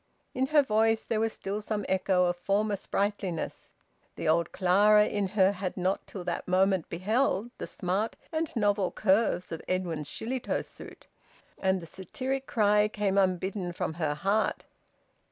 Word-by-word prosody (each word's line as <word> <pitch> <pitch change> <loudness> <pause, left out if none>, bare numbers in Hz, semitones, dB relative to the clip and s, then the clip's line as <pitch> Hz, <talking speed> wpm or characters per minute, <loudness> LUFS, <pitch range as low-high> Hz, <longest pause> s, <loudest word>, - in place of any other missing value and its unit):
In 260 +1 0
her 295 0 +5
voice 225 -2 +2
there 225 - -1
was 225 0 +1
still 205 +1 -4
some 210 -1 -3
echo 185 -1 +2
of 175 0 +1
former 205 +3 0
sprightliness. 195 -3 -3 0.4
The - - -4
old 165 +1 +2
Clara 205 +3 +5
in 205 -2 -1
her 190 0 +6
had 190 -2 -4
not 185 +2 -1
till 185 - -7
that 175 -1 -3
moment 185 -1 +2
beheld 215 +4 0
the - - -4
smart 195 +4 -2 0.2
and 320 -1 -1
novel 205 -4 +2
curves 195 -3 +1
of 165 - -5
Edwin's 170 -5 -2
Shillitoe 250 - -2
suit, - - -12 0.5
and 190 0 +1
the 170 - -9
satiric 260 - -4
cry 210 -1 +3
came 205 -2 -1
unbidden 185 -1 0
from 175 -2 -3
her 150 -2 0
heart. 200 +8 0
195 Hz, 155 wpm, -29 LUFS, 180-215 Hz, 0.5 s, her